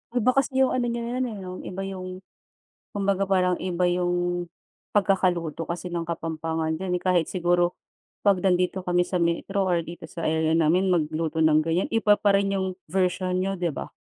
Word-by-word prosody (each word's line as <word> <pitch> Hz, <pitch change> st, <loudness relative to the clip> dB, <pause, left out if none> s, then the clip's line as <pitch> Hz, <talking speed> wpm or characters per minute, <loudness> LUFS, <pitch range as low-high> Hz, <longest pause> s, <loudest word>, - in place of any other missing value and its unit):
Iba 245 Hz, +1 st, +4 dB
kasi 265 Hz, 0 st, +2 dB
yung 260 Hz, -, +2 dB
ano 250 Hz, -1 st, 0 dB
niyo 235 Hz, 0 st, -2 dB
yun, 250 Hz, +2 st, -1 dB
eh, 225 Hz, -, -6 dB
'no? 190 Hz, -2 st, -7 dB
Iba 190 Hz, +1 st, -6 dB
yung 185 Hz, -1 st, -6 dB, 0.7 s
kumbaga 195 Hz, -1 st, 0 dB
parang 180 Hz, -2 st, +3 dB
iba 180 Hz, -1 st, 0 dB
yung 175 Hz, 0 st, 0 dB, 0.4 s
pagkakaluto 180 Hz, -6 st, +1 dB
kasi 175 Hz, +1 st, -4 dB
ng 170 Hz, -, -1 dB
kapampangan 160 Hz, -1 st, -2 dB
din, 180 Hz, -1 st, 0 dB
eh. -, -, -10 dB
Kahit 180 Hz, -3 st, +2 dB
siguro 175 Hz, -1 st, +1 dB, 0.5 s
'pag 200 Hz, -2 st, +5 dB
nandito 180 Hz, 0 st, +1 dB
kami 180 Hz, 0 st, +2 dB
sa 180 Hz, -, -1 dB
metro 190 Hz, +4 st, 0 dB
or 175 Hz, -1 st, +2 dB
dito 170 Hz, 0 st, -8 dB
sa 165 Hz, -, -5 dB
area 160 Hz, 0 st, +1 dB
namin 170 Hz, +4 st, +3 dB
magluto 160 Hz, -1 st, 0 dB
ng 155 Hz, 0 st, +5 dB
ganyan, 165 Hz, +4 st, 0 dB
iba 225 Hz, -2 st, +4 dB
pa 205 Hz, -1 st, +3 dB
rin 195 Hz, 0 st, +2 dB
yung 190 Hz, -1 st, -2 dB, 0.2 s
version 185 Hz, -1 st, 0 dB
niyo, 190 Hz, +1 st, 0 dB
di 175 Hz, -1 st, 0 dB
ba? -, -, -7 dB
180 Hz, 185 wpm, -25 LUFS, 170-195 Hz, 0.7 s, pag